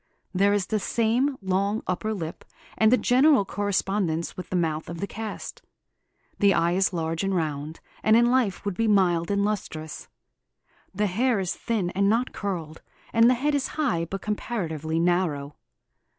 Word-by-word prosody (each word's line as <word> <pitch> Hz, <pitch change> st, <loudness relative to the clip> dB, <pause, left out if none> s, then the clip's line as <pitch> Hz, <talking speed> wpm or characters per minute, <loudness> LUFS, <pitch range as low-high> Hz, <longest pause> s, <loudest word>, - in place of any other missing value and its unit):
There 200 Hz, +2 st, +3 dB
is 205 Hz, -2 st, +1 dB
the 215 Hz, +1 st, -1 dB
same 240 Hz, +6 st, +1 dB
long 195 Hz, +3 st, 0 dB
upper 185 Hz, +4 st, -2 dB
lip, 170 Hz, -6 st, -5 dB, 0.3 s
and 220 Hz, 0 st, +4 dB
a 255 Hz, -, +6 dB
general 260 Hz, -3 st, +4 dB
correspondence 195 Hz, -4 st, -1 dB
with 185 Hz, -, -8 dB
the -, -, -2 dB
mouth 160 Hz, -3 st, -1 dB
of 170 Hz, -1 st, -6 dB
the 200 Hz, -, -1 dB
cast. 220 Hz, +1 st, -7 dB, 0.8 s
The 200 Hz, -2 st, +4 dB
eye 170 Hz, 0 st, +2 dB
is 190 Hz, +2 st, +2 dB
large 165 Hz, 0 st, -2 dB
and 195 Hz, -1 st, 0 dB
round, 155 Hz, -2 st, -3 dB, 0.2 s
and 220 Hz, -, +4 dB
in 240 Hz, +1 st, +4 dB
life 240 Hz, -9 st, +1 dB
would 200 Hz, -, -1 dB
be 225 Hz, +3 st, +1 dB
mild 180 Hz, -5 st, +3 dB
and 200 Hz, 0 st, +1 dB
lustrous. 160 Hz, -7 st, -4 dB, 0.8 s
The 205 Hz, +2 st, 0 dB
hair 225 Hz, +4 st, +1 dB
is 185 Hz, -2 st, -1 dB
thin 205 Hz, -7 st, -2 dB
and 200 Hz, +2 st, +2 dB
not 235 Hz, +4 st, +1 dB
curled, 170 Hz, -6 st, -4 dB, 0.3 s
and 230 Hz, +1 st, +6 dB
the 255 Hz, -, +4 dB
head 290 Hz, +5 st, 0 dB
is 285 Hz, -2 st, 0 dB
high 240 Hz, -, +1 dB
but 195 Hz, +4 st, -6 dB
comparatively 165 Hz, -8 st, -2 dB
narrow. 165 Hz, -5 st, 0 dB
195 Hz, 170 wpm, -25 LUFS, 170-220 Hz, 0.8 s, a